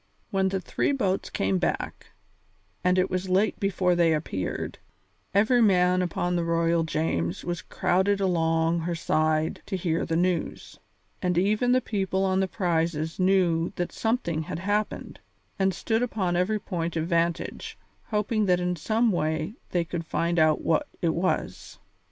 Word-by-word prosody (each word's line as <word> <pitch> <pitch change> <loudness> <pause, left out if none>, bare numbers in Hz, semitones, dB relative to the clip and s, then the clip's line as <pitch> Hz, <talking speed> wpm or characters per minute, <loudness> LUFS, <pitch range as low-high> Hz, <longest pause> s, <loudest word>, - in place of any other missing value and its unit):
When 190 -1 +2
the 190 0 -1
three 185 - -1
boats 195 -8 -1
came 95 -1 0
back, - - -3 0.8
and 180 0 +3
it 185 0 +3
was 185 +1 -2
late 195 +4 +2
before 185 -2 +1
they 170 -2 +3
appeared, 95 - -4 0.5
every 220 +5 +4
man 180 -3 +4
upon 175 0 -1
the 170 - 0
Royal 165 0 +2
James 100 - -1
was 175 -1 -3
crowded 190 +3 +1
along 165 -3 +1
her 170 +1 -2
side 155 -1 0
to 195 - -2
hear 170 -2 -1
the 165 - -2
news, 175 0 -1 0.4
and 180 -1 0
even 215 +7 +2
the 255 0 +4
people 195 -3 -1
on 190 0 +1
the 190 - +1
prizes 165 -4 -1
knew 180 -3 +2
that 175 - -2
something 220 -9 -1
had 155 - -5
happened, 205 +4 -2 0.4
and 190 0 +3
stood 225 +4 -1
upon 200 -7 -1
every 185 +5 +1
point 170 -5 -4
of 160 -1 0
vantage, 170 -1 -1 0.3
hoping 210 0 0
that 180 -1 +3
in 180 0 -1
some 220 +7 +1
way 155 0 -1 0.2
they 175 -2 0
could 165 -1 -5
find 170 +1 0
out 155 -1 +3
what 160 - +1 0.2
it 165 -2 +2
was. 185 +2 -2
180 Hz, 160 wpm, -26 LUFS, 165-195 Hz, 0.8 s, every